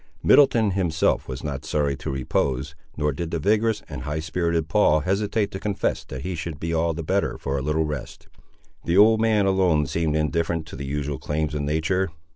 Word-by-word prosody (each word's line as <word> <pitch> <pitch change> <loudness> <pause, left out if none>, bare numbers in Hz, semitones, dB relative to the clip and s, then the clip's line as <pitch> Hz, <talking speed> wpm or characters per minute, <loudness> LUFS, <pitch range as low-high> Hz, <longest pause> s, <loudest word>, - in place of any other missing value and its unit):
Middleton 120 -7 +5
himself 90 -4 +1
was 65 0 -6
not 70 -3 -4
sorry 75 -2 0
to - - -6
repose, 65 +1 -1 0.2
nor 75 0 +1
did 80 +4 -4
the 85 - -2
vigorous 110 +5 +1
and 70 -3 -7
high 75 +3 -3
spirited 85 0 -1
Paul 90 -6 +3
hesitate 100 +4 0
to 95 - -5
confess 105 -1 -1
that 65 0 -7
he 95 - -3
should 80 -3 -5
be 85 +1 -3
all 80 0 +1
the 85 - -4
better 95 +5 0
for 70 - -3
a 70 - -1
little 75 +3 0
rest. 75 -4 -6 0.6
The 85 +2 +1
old 110 +2 +6
man 110 -3 +3
alone 90 -6 +3
seemed 80 +3 -1
indifferent 80 +1 0
to - - -8
the 70 0 -6
usual 70 -1 -3
claims 75 -1 -2
of 75 - -2
nature. 80 +6 0
80 Hz, 200 wpm, -24 LUFS, 75-95 Hz, 0.6 s, old